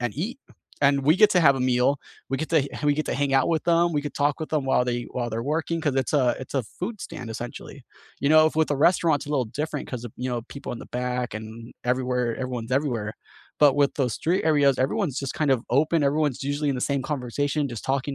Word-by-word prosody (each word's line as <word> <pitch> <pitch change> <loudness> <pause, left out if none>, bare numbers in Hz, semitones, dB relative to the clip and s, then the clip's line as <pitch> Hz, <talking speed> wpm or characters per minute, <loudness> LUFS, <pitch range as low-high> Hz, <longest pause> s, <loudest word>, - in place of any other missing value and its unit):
and 120 -3 -2
eat, 205 - -3 0.4
and 140 0 +4
we 155 +5 +5
get 215 +1 +6
to 180 - +4
have 140 -4 +5
a - - -3
meal. 125 +2 +2 0.3
We 135 - +1
get 160 - -4
to 165 - +5
h - - -6
we 145 0 +4
get 155 +1 -2
to - - -1
hang 140 -1 0
out 135 -1 +3
with 165 -2 0
them. 170 0 +3
We 145 - 0
could 145 - -6
talk 145 0 +1
with 155 - -5
them 150 -3 0
while 130 -2 +3
they 120 -1 -1
while 120 -2 -3
they're 115 +1 -3
working, 165 +4 -1
'cause 145 -4 0
it's 130 -2 0
a 130 -5 +3
it's 130 - -9
a 135 - +1
food 195 - -6
stand 125 -3 -7
essentially. 120 +3 -8 0.4
You 140 - +1
know, 155 0 +7
if 155 - -1
with 160 0 +3
the 145 - 0
restaurants 160 0 +3
it's - - -6
little 135 -5 +1
different, 150 +6 -4
'cause 125 -2 -5
of, 120 - -8
you 125 +1 -3
know, 120 -2 -2
people 140 - -7
in 120 - -6
the - - -10
back 125 -1 -2
and 110 +2 -8
everywhere 125 -1 0
everyone's 125 -2 -4
everywhere, 120 -7 -1 0.5
but 145 -2 +6
with 145 -1 +2
those 130 -5 0
street 175 +4 0
areas, 145 -4 +3
everyone's 140 - 0
just 135 -2 -4
kind 150 -3 0
of 125 -3 0
open. 150 +4 +2
Everyone's 145 -2 0
usually 145 +1 -1
in 135 - -1
the 125 - -3
same 140 -1 0
conversation, 145 +1 -1
just 120 -4 -6
talking 135 +1 -1
140 Hz, 255 wpm, -25 LUFS, 125-150 Hz, 0.5 s, know